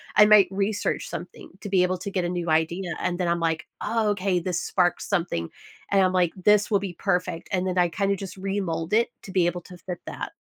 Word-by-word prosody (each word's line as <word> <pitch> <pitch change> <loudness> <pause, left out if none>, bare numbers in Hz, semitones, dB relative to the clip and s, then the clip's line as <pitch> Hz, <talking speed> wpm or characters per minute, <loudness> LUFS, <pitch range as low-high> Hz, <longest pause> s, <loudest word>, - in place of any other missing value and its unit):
I 210 - +8
might 210 -3 +7
research 200 +2 -1
something - - -8
to 205 - -6
be 185 -2 +4
able 185 0 0
to 200 +2 -5
get 185 -2 -1
a 175 - -1
new 175 -2 -2
idea 170 +3 0
and 175 -1 -1
then 180 - 0
I'm 170 0 +1
like, 165 -1 -1 0.2
"Oh, 225 -2 +1
okay, 190 -2 0
this 175 0 -2
sparks 180 -2 0
something." 165 - -1 0.4
And 195 -1 +4
I'm 185 - +2
like, 180 -2 +2
"This 210 +2 +3
will 200 -2 +3
be 190 -3 -5
perfect," 180 -2 -1
and 185 -1 0
then 180 0 -2
I 175 -1 +3
kinda 200 +2 0
just 195 0 -8
remold 190 -3 -2
it 230 +2 +3
to 190 - -9
be 180 -3 +3
able 175 0 -2
to 180 +1 -13
fit 180 -1 -6
that. - - -6
185 Hz, 235 wpm, -25 LUFS, 175-200 Hz, 0.4 s, I